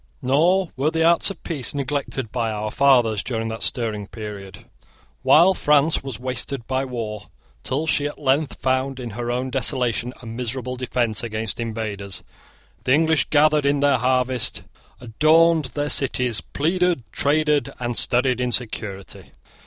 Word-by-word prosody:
Nor 170 +8 +2
were 140 +3 +1
the 160 0 0
arts 170 +3 +4
of 195 - -9
peace 145 -6 -3
neglected 135 -4 -3
by 115 -2 -1
our 105 0 -3
fathers 120 -7 +3
during 115 -1 -3
that 110 0 -6
stirring 110 -4 -2
period. 105 -4 -9 0.6
While 155 +8 +6
France 150 -2 +3
was 135 -5 -7
wasted 125 0 -3
by 130 +2 -1
war, 110 -5 -5 0.4
till 140 +5 -2
she 145 -1 +1
at 145 - -8
length 140 +1 0
found 130 +1 -1
in 120 -2 -6
her 120 +3 -4
own 125 +2 -2
desolation 125 -3 +1
a 125 - -13
miserable 125 +2 -4
defence 125 -3 -1
against 110 -1 -4
invaders, 110 -4 -4 0.6
the 130 - +2
English 160 +1 +3
gathered 150 0 +4
in 140 0 +2
their 140 -3 +3
harvests, 125 -1 +1 0.4
adorned 155 +6 +3
their 145 +4 -3
cities, 125 -5 +1
pleaded, 175 -1 0
traded, 150 -1 +1
and 120 -1 -3
studied 125 +1 +1
in 125 0 0
security. 105 -5 -5
130 Hz, 150 wpm, -22 LUFS, 115-145 Hz, 0.6 s, While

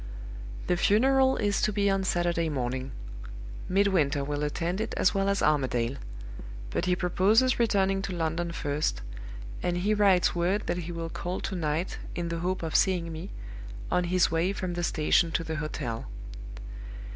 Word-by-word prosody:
"The 180 - +1
funeral 265 +7 +4
is 205 -2 +1
to 215 - +2
be 200 -1 +1
on 195 -1 +2
Saturday 175 -2 0
morning. 130 -1 -3 0.8
Midwinter 180 -8 +2
will 145 +1 -3
attend 170 +6 -1
it 225 - -3
as 180 - +3
well 195 0 +1
as 200 0 +1
Armadale. 130 -4 +1 0.7
But - - -1
he 180 0 +2
proposes 205 +9 +3
returning 195 -4 +2
to 195 - -4
London 170 +1 -1
first; 145 - -2 0.6
and 175 0 0
he 200 +4 +1
writes 200 -4 +4
word 180 +4 0
that 175 - -1
he 175 -1 -5
will 165 -1 -4
call 175 +2 -4
to 190 - -3
night, 160 +1 -2 0.2
in 170 -1 -2
the 170 0 -3
hope 180 +1 -2
of 160 -2 -3
seeing 175 -3 +2
me, 165 +5 -6 0.6
on 180 - +2
his 180 -1 +2
way 165 +3 +1
from 185 -2 -3
the 175 0 -3
station 165 +1 +2
to 165 - 0
the 160 -1 -4
hotel. 125 - -4
175 Hz, 170 wpm, -28 LUFS, 160-195 Hz, 0.8 s, funeral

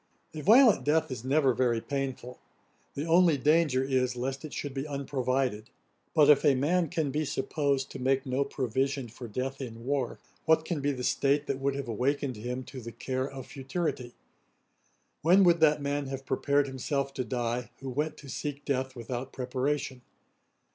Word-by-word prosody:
A 155 - -5
violent 230 - +6
death 155 0 +2
is 125 -3 -5
never 135 0 +3
very 120 -1 +1
painful; 130 -1 -4 0.6
the 145 - -3
only 170 -2 +5
danger 150 -2 +3
is 130 -2 0
lest 135 +2 -3
it 155 - -7
should 145 -2 -4
be 135 +2 -3
unprovided. 130 -5 -1 0.5
But 150 -3 +6
if 150 -2 +6
a 145 -3 +5
man 165 +5 +1
can 150 -3 -1
be 150 +3 0
supposed 140 -1 -1
to - - -7
make 135 +1 +1
no 130 +1 +1
provision 135 0 -2
for 120 +2 -9
death 130 +5 -4
in 115 -2 -7
war, 135 -2 -1 0.3
what 160 0 +4
can 160 -4 -2
be 145 +1 +1
the 125 -2 -5
state 140 +3 +2
that 140 -2 -2
would 135 0 0
have 140 -2 -4
awakened 130 +2 -1
him 125 +4 -4
to 130 0 -9
the 115 0 -7
care 130 +3 -3
of 135 -2 -8
futurity? 135 -3 -4 1.1
When 185 +5 +6
would 170 -2 +5
that 150 -2 +4
man 140 0 -1
have 135 0 -6
prepared 140 +2 +1
himself 140 +1 -2
to 130 - -2
die, 120 0 -2
who 135 - -9
went 150 +4 -2
to 145 - -12
seek 145 +1 -5
death 130 -2 -1
without 125 +2 -5
preparation? 130 +1 -2
135 Hz, 180 wpm, -29 LUFS, 130-145 Hz, 1.1 s, violent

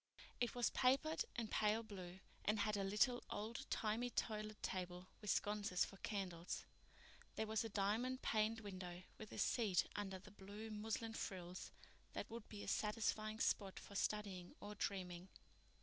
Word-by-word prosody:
It 240 -1 +2
was 245 -1 +3
papered 275 +5 +4
in 235 -2 0
pale 215 +2 +3
blue 190 -3 -7 0.2
and 210 +1 +3
had 210 0 +3
a 200 - +1
little, 210 +5 +4
old 215 +3 -3
timey 225 +3 +1
toilet 215 -2 -1
table 180 -1 -2 0.2
with 210 - -3
sconces 205 -3 +3
for 195 - -10
candles. 185 -5 -2 0.7
There 220 - +1
was 220 0 +2
a 225 - -2
diamond 220 +6 +1
paned 220 0 +3
window 185 -3 -5 0.2
with 215 - -7
a - - -6
seat 210 -7 +4
under 195 -2 -1
the 185 - -12
blue 205 +2 -7
muslin 225 +1 -1
frills 180 -4 -4 0.4
that - - -3
would 230 -1 -6
be 205 -1 -5
a - - -6
satisfying 215 0 +1
spot 195 -4 +2
for - - -10
studying 200 -3 0
or 205 +1 -5
dreaming. 185 -3 -2
210 Hz, 160 wpm, -44 LUFS, 190-220 Hz, 0.7 s, papered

